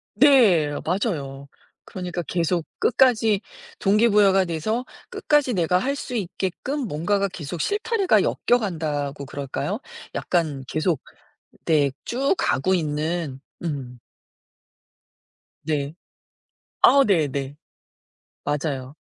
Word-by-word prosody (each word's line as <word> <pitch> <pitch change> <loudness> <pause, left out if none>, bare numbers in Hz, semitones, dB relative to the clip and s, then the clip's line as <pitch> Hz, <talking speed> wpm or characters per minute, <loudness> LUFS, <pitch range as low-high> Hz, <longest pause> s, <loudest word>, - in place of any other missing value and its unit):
네 210 - +5
맞아요. 150 - -2 0.4
그러니까 180 -1 -5
계속 170 0 -1
끝까지 225 -5 +3 0.4
동기부여가 200 -2 +4
돼서 215 +9 -2 0.2
끝까지 290 -5 +1
내가 180 -1 +2
할 275 +8 -1
수 255 -3 -6
있게끔 200 - -3
뭔가가 195 +5 0
계속 160 -1 -6
실타래가 415 -1 +2
엮여 245 - +2
간다고 150 - -3
그럴까요? 140 - -4 0.4
약간 155 -6 -1
계속 155 0 0 0.6
네. 150 -4 +3
쭉 270 +7 +1
가고 140 +10 +1
있는. 155 -3 -2 0.2
음. 135 -7 -5 1.7
네. 145 -1 -2 0.9
아 280 0 +7
네네. 145 -7 0 0.9
맞아요. 145 -2 -3
175 Hz, 205 characters per minute, -23 LUFS, 145-210 Hz, 1.7 s, 아